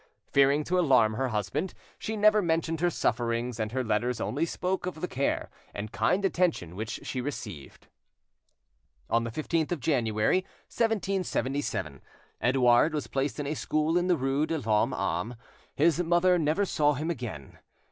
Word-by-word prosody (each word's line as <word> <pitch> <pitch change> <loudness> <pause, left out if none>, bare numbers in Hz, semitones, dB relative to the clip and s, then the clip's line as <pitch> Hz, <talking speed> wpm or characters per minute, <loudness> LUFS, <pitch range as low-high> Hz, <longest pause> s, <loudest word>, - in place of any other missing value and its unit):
Fearing 140 +2 +4
to 180 +4 +1
alarm 125 -10 +4
her 130 +5 -1
husband, 120 - -2 0.2
she 220 0 -3
never 210 0 +5
mentioned 165 -2 0
her 175 - +3
sufferings, 120 -4 -1
and 110 -1 -2
her 130 +1 -1
letters 115 +2 0
only 155 +5 -1
spoke 185 +2 -2
of 175 -3 -5
the 180 - -2
care 140 -2 -1 0.2
and 105 +1 -5
kind 180 - +1
attention 170 - 0
which 110 +2 -5
she 130 - -3
received. 105 - -7 1.3
On 115 +1 +2
the - - -3
15th 155 +6 -1
of 175 - -1
January, 115 -2 +1 0.3
1777, 185 - -1 0.4
Edouard 125 +4 +4
was 150 - -2
placed 135 -2 -2
in 145 - -2
a 145 - -1
school 155 +1 0
in 175 0 +2
the 180 -2 +3
rue 135 +3 0
de 165 - -1
l'Homme 110 -6 +1
Arme. 90 +9 -2 0.4
His 165 +3 +3
mother 175 +1 +3
never 160 +6 +1
saw 150 -5 +2
him 155 +5 -2
again. 115 - -7
140 Hz, 160 wpm, -28 LUFS, 115-170 Hz, 1.3 s, never